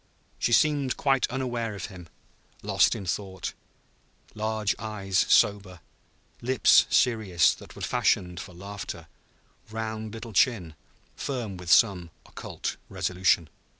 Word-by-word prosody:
She - - 0
seemed 140 +1 +2
quite 135 -2 +2
unaware 120 -4 -3
of 95 - -5
him, 90 -5 -11 0.5
lost - - +3
in 95 - -6
thought, 95 +1 -4 0.8
large 110 -1 -1
eyes 100 -3 -1
sober, 95 -3 +3 0.6
lips 125 0 +5
serious 105 -8 +3
that - - -13
were - - -8
fashioned 90 -1 +1
for 90 -2 -9
laughter, 100 +2 -7 0.6
round 110 0 -4
little 115 0 -8
chin 100 - +2 0.4
firm 120 -8 -4
with 90 -1 -8
some 95 -6 +4 0.2
occult - - -6
resolution. 90 -2 +1
105 Hz, 115 wpm, -27 LUFS, 95-115 Hz, 0.8 s, lips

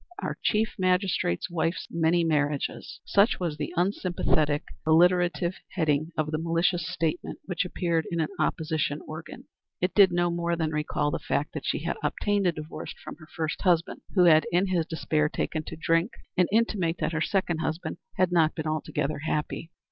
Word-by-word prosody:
Our - - -3
Chief 215 0 +1
Magistrate's 185 - +1
Wife's 165 0 -1
Many 170 +1 +2
Marriages!" 150 -3 -1
Such 200 +3 +3
was 170 -5 -2
the 150 -1 -3
unsympathetic, 175 -5 +1 0.2
alliterative 175 +2 +3 0.2
heading 155 -2 +1
of 155 -1 0
the 155 - -1
malicious 170 +2 0
statement 165 -2 -2
which 180 -2 -1
appeared 170 -3 -1
in 170 - -2
an 155 - 0
opposition 155 -2 0
organ. 155 0 -8 0.4
It 180 +1 0
did 195 -3 +7
no 175 0 +1
more 170 0 0
than 160 -2 -1
recall 150 -1 -1
the - - -2
fact - - -2
that - - -5
she - - -1
had - - -2
obtained 205 -2 0
a - - +4
divorce 155 -1 -7
from - - -8
her 155 -2 -14
first 160 -1 -2
husband, 175 -3 +1
who 180 - +6
had 160 -2 +6
in 180 +2 +2
his 170 -3 +1
despair 155 -2 0
taken 155 - -2
to - - -6
drink, 165 +2 +1 0.3
and 180 -2 +3
intimate 200 -7 +1
that - - -1
her 160 - -1
second 175 -3 0
husband 160 +1 -3 0.2
had 185 -1 +2
not 160 -3 +3
been 160 - -4
altogether 155 -1 -2
happy. 150 +2 -2
165 Hz, 180 wpm, -27 LUFS, 155-180 Hz, 0.4 s, did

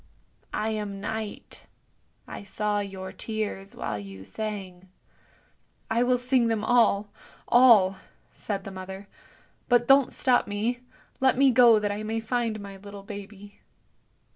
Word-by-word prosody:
I 215 +1 -1
am 210 -2 -4
Night. 215 +1 -6 0.6
I - - -7
saw 205 +1 -2
your 190 -2 -6
tears 205 -1 -5
while 105 - -4
you 95 -1 -10
sang." 190 - -6 0.5
" - - -25
I 230 +1 +2
will 250 0 +3
sing 250 -1 +2
them 225 -2 -1
all 215 -4 +3 0.2
— - - -25
all," 220 -6 +6 0.4
said 200 -2 -4
the 195 - -8
mother; 190 +1 -8 0.3
" - - -34
but 240 -1 +4
don't 270 -1 +5
stop 250 -2 +2
me; 220 +4 -2 0.4
let 260 -1 +3
me 270 0 +5
go 240 -2 +7
that 210 -1 -1
I 205 +1 -4
may 220 +1 -2
find 225 -1 -2
my 200 -1 -9
little 200 0 -11
baby." 205 0 -10
210 Hz, 150 wpm, -26 LUFS, 195-235 Hz, 0.6 s, go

